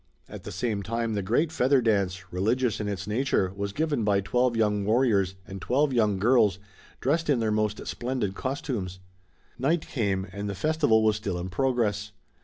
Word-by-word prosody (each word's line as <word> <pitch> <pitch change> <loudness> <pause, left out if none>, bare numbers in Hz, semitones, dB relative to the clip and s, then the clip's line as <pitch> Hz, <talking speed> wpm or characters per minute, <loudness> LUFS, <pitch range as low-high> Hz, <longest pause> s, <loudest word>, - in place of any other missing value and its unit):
At - - -10
the - - -6
same 110 -4 -2
time 115 +2 -2
the 100 - -1
great 120 - +1
Feather 135 -2 +3
Dance, 100 -5 0
religious 110 +6 +1
in 105 - -2
its 100 -1 -3
nature, 105 -4 0
was 100 0 -3
given 145 -1 -1
by 100 -1 +3
twelve 120 +4 +1
young 105 -2 +1
warriors 105 -4 +2
and 95 -1 -8
twelve 140 +5 +1
young 105 -5 +2
girls, 105 -2 +3 0.4
dressed 160 +4 0
in 135 -4 +3
their 110 -1 0
most 105 0 -1
splendid 120 -5 -2
costumes. 110 - -4 0.6
Night 155 +6 +1
came, 100 -7 -1
and 100 +1 -4
the 100 - -4
festival 145 - +2
was 110 -1 +3
still 100 -4 -3
in 90 +1 -4
progress. 105 -1 0
110 Hz, 180 wpm, -27 LUFS, 100-125 Hz, 0.6 s, Feather